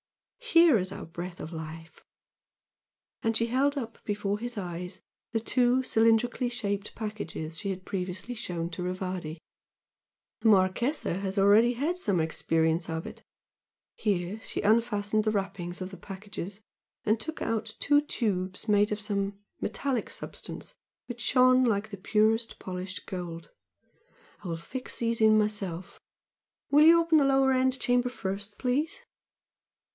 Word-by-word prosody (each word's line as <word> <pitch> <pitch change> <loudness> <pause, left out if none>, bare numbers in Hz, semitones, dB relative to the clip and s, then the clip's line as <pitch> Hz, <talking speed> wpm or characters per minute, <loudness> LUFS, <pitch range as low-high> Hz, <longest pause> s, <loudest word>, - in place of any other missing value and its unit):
Here 335 - +5
is 185 +1 -3
our - - -6
breath 175 +2 -7
of 160 - -7
life!" 160 0 -8 1.2
And 225 0 +1
she 230 - +2
held 275 +4 +2
up 230 -4 -6
before 205 -1 -1
his 240 0 -4
eyes 180 -1 -5 0.3
the 225 - +1
two 250 +2 +2
cylindrically 230 +2 +3
shaped 205 -3 -3
packages 170 -7 -5
she 200 - -3
had 185 -1 -4
previously 185 +4 -4
shown 175 -7 -3
to 165 - -5
Rivardi 180 -3 -3 1.0
"The - - +2
Marchese 210 +9 +2
has 195 +2 -3
already 210 +5 +6
had 295 +9 -1
some 205 - 0
experience 160 +1 +1
of 160 0 -3
it" - - -9 0.7
here 200 0 -1
she - - -4
unfastened 215 -1 +2
the 215 - +1
wrappings 195 -3 -3
of 185 0 -5
the 190 - -9
packages, 200 +1 -7 0.4
and 215 +1 +2
took 320 +6 -6
out 220 -1 -2
two 290 0 +4
tubes 200 -9 -2
made 205 0 +4
of 210 - -1
some 200 -1 -2 0.2
metallic 265 -5 -1
substance - - -7 0.3
which 245 -1 -7
shone 255 +1 +5
like 210 -4 -1
purest 220 +3 +2
polished 185 +1 -6
gold 170 -3 -6 0.9
"I - - -6
will 165 -1 -2
fix 255 +10 -6
these 230 -1 -1
in 215 0 +6
myself 200 -5 -2 0.7
will 295 +1 +7
you 335 +1 +8
open 330 -2 +4
the 280 - +4
lower 270 -1 +4
end 260 0 +2
chamber 245 0 +2
first, 200 -2 -5
please?" 300 - -1
210 Hz, 145 wpm, -29 LUFS, 185-245 Hz, 1.2 s, you